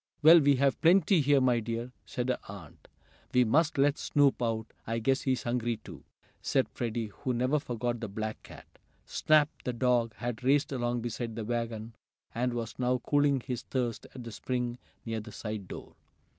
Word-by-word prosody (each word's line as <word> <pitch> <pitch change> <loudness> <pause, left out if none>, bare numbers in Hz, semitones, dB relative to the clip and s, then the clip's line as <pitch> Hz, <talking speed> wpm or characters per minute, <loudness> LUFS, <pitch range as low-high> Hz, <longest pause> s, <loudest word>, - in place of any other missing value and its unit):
"Well, 165 +2 +10
we 145 -2 +4
have 135 +1 +1
plenty 180 +1 +5
here, 140 0 +4
my 125 -2 +3
dear," 115 +2 -4 0.2
said 125 0 -3
her - - 0
aunt. - - -11 0.5
"We 125 - +6
must 155 +7 +2
let 140 +1 +3
Snoop 140 -3 +2
out. 115 -2 -1 0.2
I 115 +1 -1
guess 130 +4 +1
he's 130 -2 0
hungry, 120 -1 -1
too," - - -12 0.4
said - - +1
Freddie, 115 -2 -3
who 130 -2 -1
never 130 +5 +2
forgot 120 -2 -3
the 115 - -4
black 110 +2 -5
cat. - - -13 0.4
Snap, 155 -1 +3 0.2
the 125 - -2
dog, 120 -2 +1
had 120 +1 -4
raced 140 +3 +3
along 120 -2 -1
beside 115 -1 -4
the 110 -2 -4
wagon, 115 -1 -3 0.4
and 125 +1 -1
was 115 0 -5
now 125 0 +2
cooling 145 +1 +2
his 125 0 -4
thirst 120 -4 -3
at 125 - -7
the 115 - -7
spring 125 +1 -3 0.3
near 115 -1 -2
the 105 - -9
side 105 -3 -6
door. - - -9
120 Hz, 185 wpm, -30 LUFS, 115-135 Hz, 0.5 s, Well